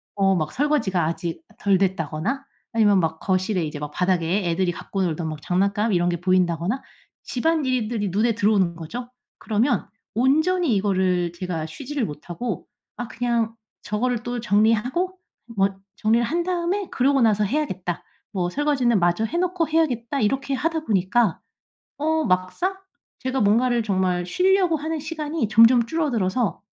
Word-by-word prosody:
어 195 -1 +3
막 155 -3 -1
설거지가 245 - +1
아직 170 - -3 0.2
덜 200 -2 +3
됐다거나 190 - -1 0.3
아니면 205 -4 +4
막 160 -1 -2
거실에 185 -2 0
이제 150 -1 -5
막 150 0 -5
바닥에 180 +1 +1
애들이 175 +1 +1
갖고 195 +3 -3
놀던 165 -1 -2
막 155 -1 -6
장난감 200 +6 +1
이런 175 0 +2
게 175 0 -2
보인다거나 185 - +1 0.4
집안일들이 250 - 0
눈에 220 +5 +2
들어오는 200 -5 +2
거죠. 240 +10 -6 0.3
그러면 230 +2 0 0.3
온전히 315 +5 +3
이거를 185 -3 +1
제가 170 -3 -4
쉬지를 260 - -4
못하고 175 +10 -5 0.3
'아 245 - -4
그냥 235 -2 -1 0.3
저거를 235 +2 -1
또 245 0 -3
정리하고 230 - +1 0.4
뭐 195 0 +4 0.3
정리를 230 +2 +2
한 340 +7 0
다음에 365 +2 -1
그러고 275 +2 +2
나서 210 -2 +3
해야겠다.' 190 - -2 0.3
뭐 180 -3 0
'설거지는 265 -5 +2
마저 175 +5 +2
해 335 +9 -3
놓고 360 -2 0
해야겠다.' 280 -5 0
이렇게 270 +6 0
하다 320 +2 -1
보니까 205 - +2 0.6
어 315 +1 +1
막상 185 - 0 0.5
제가 260 +1 -1
뭔가를 235 +4 +3
정말 185 -3 0
쉬려고 365 - +3
하는 315 +1 -3
시간이 310 -4 -3
점점 230 +2 +6
줄어들어서 240 - 0
220 Hz, 335 characters per minute, -23 LUFS, 185-275 Hz, 0.6 s, 점점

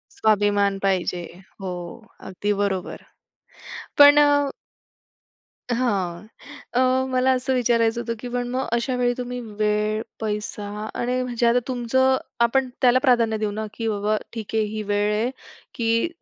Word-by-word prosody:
स्वाभिमान 205 -2 +2
पाहिजे. 185 -2 0 0.4
हो 190 -1 -4 0.6
अगदी 205 +2 -1
बरोबर. 190 -3 -3 1.0
पण 290 0 +9
अ 285 -1 +4 1.2
हां. 200 -6 -1 0.5
अ, 245 - +2 0.3
मला 255 +1 +3
असं 260 +1 -1
विचारायचं 235 -1 +2
होतं 230 -1 -3
की 245 - -6
पण 245 0 -2
मग 255 +2 -2
अशा 235 +2 0
वेळी 245 -1 +1
तुम्ही 250 0 -4 0.2
वेळ, 210 0 +1 0.2
पैसा 210 -1 -3 0.3
आणि 250 +1 0
म्हणजे 240 -1 0
आता 240 +1 +4
तुमचं 260 +1 +2 0.3
आपण 260 +2 +1
त्याला 250 0 +5
प्राधान्य 235 -4 +3
देऊ 215 -1 -1
ना 215 +1 -4
की 225 0 -4
बाबा 210 0 0 0.2
ठीक 225 -2 -6
आहे 220 - +3
ही 215 0 -4
वेळ 205 +1 +1
आहे 220 +4 0 0.5
की 230 +3 +1
230 Hz, 140 wpm, -23 LUFS, 210-250 Hz, 1.2 s, पण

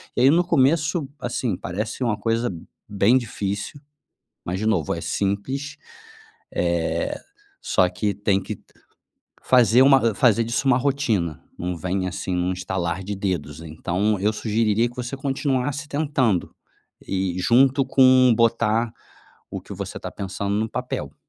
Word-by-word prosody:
E - - +1
aí 130 - +7
no 175 +2 +4
começo, 155 0 +2
assim, 120 -3 -2
parece 105 +8 -4
uma 110 -4 0
coisa 115 +1 +1 0.4
bem 105 +5 +4
difícil, 100 0 -4 0.7
mas 90 +2 -2
de 110 - -2
novo, 95 -9 +1
é - - -5
simples, 105 +9 -2 0.8
eh, - - -1 0.5
só 90 - +2
que 100 +3 -2
tem 100 -1 0
que 105 +1 -6 0.8
fazer 125 -1 +5
uma, 135 0 +7
hã, 115 -4 +1
fazer 115 0 +3
disso 120 +4 -2
uma 125 - +5
rotina, 120 - -1 0.2
não 90 0 -3
vem, 95 +3 -2
assim, 90 +1 -4
num 90 +1 0
estalar 90 0 -3
de 100 +2 -4
dedos. 85 -7 -3
Então, 90 +6 -1
eu 105 +2 +2
sugeriria 110 +1 +1
que 120 - -16
você 125 +2 -4
continuasse 135 +1 -1
tentando, 140 - 0 0.6
e 95 -2 -1
junto 135 +6 +4
com 130 -1 +5
botar 115 0 +2 0.6
o - - -5
que - - -11
você - - -6
está - - -6
pensando 100 +1 -4
no 110 +1 0
papel. - - -4
110 Hz, 145 wpm, -23 LUFS, 95-130 Hz, 0.8 s, aí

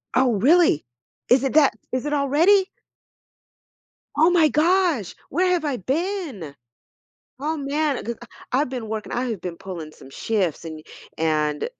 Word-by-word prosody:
Oh, 255 -2 +3
really? 280 - +4 0.4
Is 255 +2 +5
it 270 - -1
that 300 -2 +5 0.2
is 255 +2 -2
it 295 - -2
already? 325 +8 +3 1.5
Oh 320 +3 +5
my 325 -4 +4
gosh, 330 - +1
where 365 +1 +1
have 350 -3 +1
I 280 -4 -1
been?! 275 - -3 0.9
Oh, 315 +1 0
man, 285 0 -1
g 235 - -2
ah, - - -10 0.3
I've 265 +2 +2
been 245 -4 -5
working, 220 -1 -5
I 245 - -1
have 225 -7 -3
been 175 -2 -6
pulling 175 -5 -8
some 135 - -15
shifts, 185 -3 -2
an 160 -1 -6
y 155 - -12 0.4
and 155 - 0
260 Hz, 160 wpm, -23 LUFS, 190-315 Hz, 1.5 s, Is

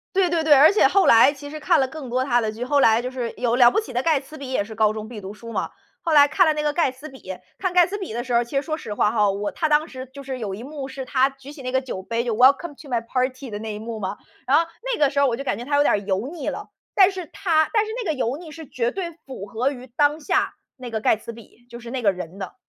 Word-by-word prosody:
对 375 -2 +3
对 335 -2 0
对， 310 -1 +6
而 290 +3 +8
且 415 - +5
后 395 - +3
来 230 +4 +7
其 285 0 -10
实 310 - -7
看 335 +1 +3
了 265 - +2
更 270 -1 -8
多 255 +2 0
他 240 -3 +2
的 220 -1 -1
剧 230 +3 -5
后 285 +2 +2
来 225 -2 +5
就 250 - -4
是 250 -3 -4
有 240 -2 0
《了 245 -1 +7
不 - - +2
起 435 - -7
的 245 +2 -1
盖 315 -4 +3
茨 300 +3 -12
比》 275 - -7
也 255 - +1
是 220 +2 -10
高 215 -1 +3
中 215 0 -6
必 220 -2 -8
读 195 +1 -7
书 230 +2 -10
嘛， 190 - -2 0.3
后 335 - -2
来 290 -2 +7
看 315 +5 +3
了 315 - +4
那 300 - -2
个 295 -1 0
盖 330 -4 +2
茨 260 +4 -11
比， 265 -10 -9 0.2
看 370 -2 -1
盖 355 -1 +5
茨 400 +2 -4
比 380 - -6
的 240 - -2
时 245 - -3
候 235 0 +4
其 240 +4 -4
实 - - +2
说 310 +1 -3
实 220 -9 -6
话 205 - +2
哈， 210 -3 +2
我 200 +1 -3
他 315 - -1
当 300 +1 +3
时 260 -3 -8
就 280 - -9
是 265 -1 -5
有 205 -4 -4
一 210 +5 -7
幕 275 0 -7
是 265 0 -6
他 260 +1 +2
举 270 +1 -13
起 295 - -11
那 255 -1 -4
个 260 - +2
酒 250 -8 -6
杯， 230 +4 -2
就 235 -3 -1
“Welcome 275 +6 +4
to 295 - -13
my 240 -2 0
party” 255 +2 -2
的 205 - -5
那 220 0 -5
一 210 - -6
幕 225 0 -6
嘛， 195 0 -4 0.3
然 270 - +4
后 335 - +3 0.3
那 - - -3
个 290 -2 +4
时 280 0 -1
候 280 - +4
我 235 -2 -1
就 275 - -6
感 200 - -1
觉 235 - -6
他 285 +3 0
有 290 - +5
点 - - +3
儿 - - +2
油 200 +3 -2
腻 330 +3 -4
了。 - - -7 0.2
但 385 -2 +6
是 375 -3 -6
他 325 -4 +1
但 435 -1 +3
是 435 - -6
那 345 - -1
个 - - -1
油 260 -2 -1
腻 325 -1 -11
是 315 0 -10
绝 240 -1 -1
对 360 -3 -4
符 260 -7 -8
合 230 +6 -1
于 255 -2 -9
当 290 +5 +1
下 300 - 0 0.2
那 250 -2 -9
个 220 - -2
盖 215 - +3
茨 220 +2 -9
比， 230 +1 -16
就 235 - -9
是 235 0 -10
那 255 +1 -3
个 205 -4 +4
人 180 -1 -8
的。 190 -2 -7
260 Hz, 375 characters per minute, -23 LUFS, 230-300 Hz, 0.3 s, 而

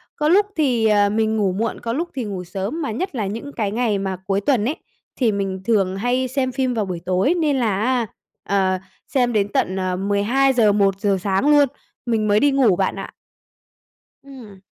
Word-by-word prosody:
có 300 -1 0
lúc 400 +5 +5
thì, 255 -8 +1
ờ, 205 -1 +4
mình 220 +1 0
ngủ 200 -3 +1
muộn, 215 +5 -2
có 230 -1 -3
lúc 335 +7 -2
thì 260 - -2
ngủ 195 -4 -5
sớm, 195 - -4
mà 285 - -2
nhất 300 - -4
là 220 -4 -1
những 230 +8 -6
cái 210 -4 -2
ngày 225 -2 0
mà 190 -1 -3
cuối 195 0 0
tuần 235 -2 +1
ấy, 285 +6 -1 0.4
thì 240 -4 +3
mình 195 -2 -3
thường 195 -5 +1
hay 245 +4 0
xem 260 0 -1
phim 255 -1 -1
vào 220 -3 -1
buổi 180 -3 -4
tối 185 - +2
nên 295 -4 +1
là 215 -6 0
á, 245 0 +1 0.4
ờ, 190 -2 +2 0.3
xem 245 -3 +1
đến 205 -2 +2
tận, 185 - 0
ờ, 185 -1 -1
12:00-1:00 205 -1 +2
sáng 195 +8 +1
luôn, 290 -1 +6 0.4
mình 225 -3 0
mới 205 0 +4
đi 285 +3 +3
ngủ 260 -8 +3
bạn 190 +1 0
ạ. - - -7 1.1
Ừm. 240 -9 -13
220 Hz, 200 wpm, -21 LUFS, 195-260 Hz, 1.1 s, luôn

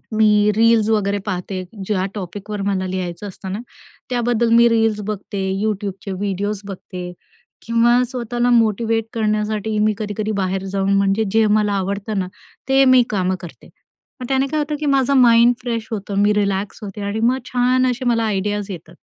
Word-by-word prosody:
मी 210 -1 +4
reels 225 -1 +4
वगैरे 205 -2 +1
पाहते. 185 -1 -3 0.2
ज्या 190 -2 0
टॉपिकवर 205 +2 -6
मला 190 -2 -1
लिहायचं 185 +1 -4
असतं 190 0 -8
ना, 200 - -3 0.5
त्याबद्दल 240 -1 +1
मी 235 0 +7
रील्स 225 -2 +1
बघते, 205 -1 -4 0.2
YouTubeचे 200 -2 -3
व्हिडिओज 200 +1 -2
बघते 180 -2 -7 0.5
किंवा 235 +1 +3
स्वतःला 245 -1 -1
मोटिव्हेट 225 -1 +2
करण्यासाठी, 215 -1 -1
मी 215 0 +3
कधी-कधी 215 0 -3
बाहेर 190 +1 -1
जाऊन 195 0 +1
म्हणजे 195 +2 +2
जे 225 0 +4
मला 210 -1 +2
आवडतं 200 +2 -2
ना 185 - -2 0.4
ते 270 0 +5
मी 255 -1 +6
कामं 185 -2 0
करते. 175 - -12 0.5
मग 250 - -5
त्याने 270 0 +2
काय 305 +2 -1
होतं, 300 0 -2
की 300 - -3
माझं 275 -1 +2
माइंड 235 -1 +6
फ्रेश 230 -2 -3
होतं, 200 -2 -4
मी 210 - +4
रिलॅक्स 200 -1 -1
होते. 205 0 -7
आणि 200 +2 -2
मग 245 +3 +2
छान 255 +1 +2
असे 250 +1 -5
मला 230 -2 +2
आयडियाज 205 0 -2
येतात. 170 -1 -10
210 Hz, 165 wpm, -20 LUFS, 195-230 Hz, 0.5 s, मी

